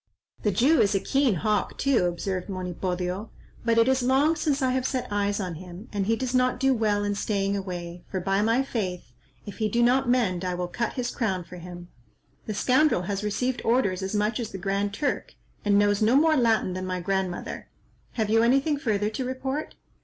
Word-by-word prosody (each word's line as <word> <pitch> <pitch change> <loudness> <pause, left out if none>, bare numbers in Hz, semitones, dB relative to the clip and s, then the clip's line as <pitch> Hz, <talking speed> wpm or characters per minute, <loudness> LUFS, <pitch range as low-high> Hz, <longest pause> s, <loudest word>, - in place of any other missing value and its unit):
"The 210 - +1
Jew 260 - +4
is 200 -1 +2
a - - +3
keen 270 -1 +2
hawk 210 +4 0
too," 270 -9 +2
observed 180 +2 -3
Monipodio, 180 +1 -3 0.3
"but 230 -1 +2
it 230 +1 +5
is 265 0 +3
long 270 +6 +3
since 300 -3 0
I 260 - +2
have 260 0 0
set 255 -2 -2
eyes 205 0 0
on 185 -3 -3
him, 180 +5 -10
and 200 -1 -1
he 225 - +3
does 255 +1 -3
not 255 0 +2
do 270 0 +3
well 210 -3 +1
in 205 0 0
staying 200 -1 -1
away, 175 -3 -5
for, 190 - -2
by 195 +2 +1
my 230 +5 +2
faith, 185 - -4 0.3
if 205 - -9
he 215 -1 +1
do 235 +3 +2
not 250 +1 +3
mend, 205 -8 +1
I 180 -1 -1
will 180 0 -2
cut 235 +4 -2
his 245 -1 -2
crown 190 -6 -1
for 180 +1 -11
him. 175 0 -9 0.6
The 215 - -3
scoundrel 255 - +3
has 200 +2 -3
received 245 +5 -1
orders 225 -6 +1
as 190 +2 -3
much 210 +2 0
as 230 -3 -3
the - - -5
Grand 195 +2 -1
Turk, 280 +8 -2 0.3
and 205 -1 +3
knows 205 0 +3
no 220 +4 +4
more 310 +2 +5
Latin 225 -7 +2
than 185 0 -4
my 185 0 -2
grandmother. 190 0 -3 0.4
Have 215 -3 -1
you 225 0 +5
anything 275 +5 +2
further 210 -5 0
to 240 +5 -3
report?" 265 +3 -4
210 Hz, 210 wpm, -26 LUFS, 190-250 Hz, 0.6 s, it